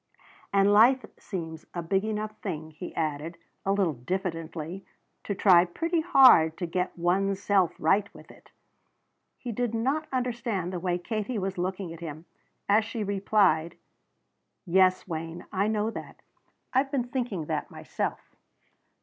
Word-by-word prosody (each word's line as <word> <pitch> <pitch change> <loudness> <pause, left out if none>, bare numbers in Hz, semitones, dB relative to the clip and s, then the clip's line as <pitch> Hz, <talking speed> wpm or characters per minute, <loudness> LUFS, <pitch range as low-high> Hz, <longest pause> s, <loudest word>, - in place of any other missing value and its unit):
And 200 +1 +4
life 245 +5 +6
seems 160 -4 -6
a 175 - -3
big 190 +4 +1
enough 215 0 -3
thing," 160 -5 -5
he 165 +4 -8
added, 155 +1 -3 0.3
a 195 - +1
little 195 -5 +2
diffidently, 165 +4 -4 0.4
"to 200 - -2
try 185 -3 +6
pretty 330 - -1
hard 255 - +6
to 180 - -2
get 180 +2 -2
one's 190 +3 +1
self 200 -3 +2
right 200 +6 +2
with - - -15
it." - - -19 0.9
He 245 - -6
did 235 0 -1
not 275 +7 0
understand 235 -8 -2
the 180 - -2
way 175 0 0
Katie 215 +5 -3
was 190 -2 -3
looking 185 -1 -3
at 165 - -11
him 160 -1 -7 0.4
as 210 +2 +4
she 225 0 -4
replied: 195 -5 +2 0.9
"Yes, 185 +1 +3
Wayne; 165 0 -5
I 195 +2 +1
know 215 0 0
that. - - -9 0.5
I've 265 +2 +2
been 265 -4 -1
thinking 235 - -2
that - - -3
myself." - - -5
195 Hz, 150 wpm, -27 LUFS, 170-220 Hz, 0.9 s, life